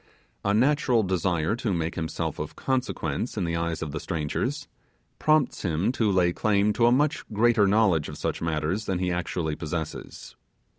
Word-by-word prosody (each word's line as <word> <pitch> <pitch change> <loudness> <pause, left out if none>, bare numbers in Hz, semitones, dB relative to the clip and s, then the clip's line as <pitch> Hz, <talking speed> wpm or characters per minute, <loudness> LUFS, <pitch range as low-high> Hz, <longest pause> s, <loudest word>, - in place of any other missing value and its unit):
A 100 - +1
natural 125 0 +3
desire 90 0 0
to 120 -4 -1
make 85 0 -2
himself 80 -1 -3
of - - -5
consequence 125 - -2
in 100 - 0
the 85 -1 -1
eyes 85 -1 -2
of 75 - -5
the - - -4
strangers, 75 -3 -2 0.5
prompts 155 -4 +2
him 85 +4 0
to 115 -5 +1
lay 90 -2 +3
claim 105 +1 +2
to 120 +1 +3
a - - +5
much 145 +4 +2
greater 110 -1 +4
knowledge 95 -7 +3
of - - -8
such - - -3
matters 80 +6 -1
than 95 - -1
he 90 0 -1
actually 85 -2 -2
possesses. 80 0 -6
95 Hz, 170 wpm, -26 LUFS, 85-115 Hz, 0.5 s, a